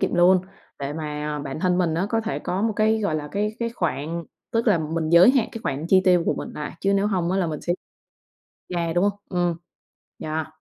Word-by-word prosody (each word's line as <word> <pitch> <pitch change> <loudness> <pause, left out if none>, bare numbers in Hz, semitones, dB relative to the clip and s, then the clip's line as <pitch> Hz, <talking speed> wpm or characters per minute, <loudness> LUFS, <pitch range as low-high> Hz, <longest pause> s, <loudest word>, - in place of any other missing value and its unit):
kiệm - - 0
luôn 180 +1 +5 0.4
để 140 +1 -3
mà 150 -1 -4
bản 140 +1 -5
thân 180 0 +2
mình 165 -3 +1
á, 180 +4 0
có 225 +1 +1
thể 225 0 -3
có 185 +3 -2
một 225 0 +1
cái, 220 +1 +3
gọi 200 -7 0
là, 150 -1 -3
cái 210 +2 -1
cái 235 0 -1
khoản, 165 - -2 0.3
tức 230 0 +1
là 205 -6 +4
mình 160 0 -2
giới 170 +7 +8
hạn 260 -4 +2
cái 230 - -6
khoản 145 +4 -2
chi 190 0 +6
tiêu 180 -2 +5
của - - +2
mình - - -5
lại, 150 - -5
chứ 195 0 +2
nếu 200 +1 +2
hông 180 -4 0
á, 190 - +1
là 185 - +1
mình 155 -2 -4
sẽ 175 - 0 1.0
yeah, 170 -1 -1
đúng 175 +2 +3
hông? 205 - +3 0.2
Ừm, 175 -2 +1 0.7
yeah. 155 0 -2
175 Hz, 240 wpm, -24 LUFS, 155-200 Hz, 1.0 s, giới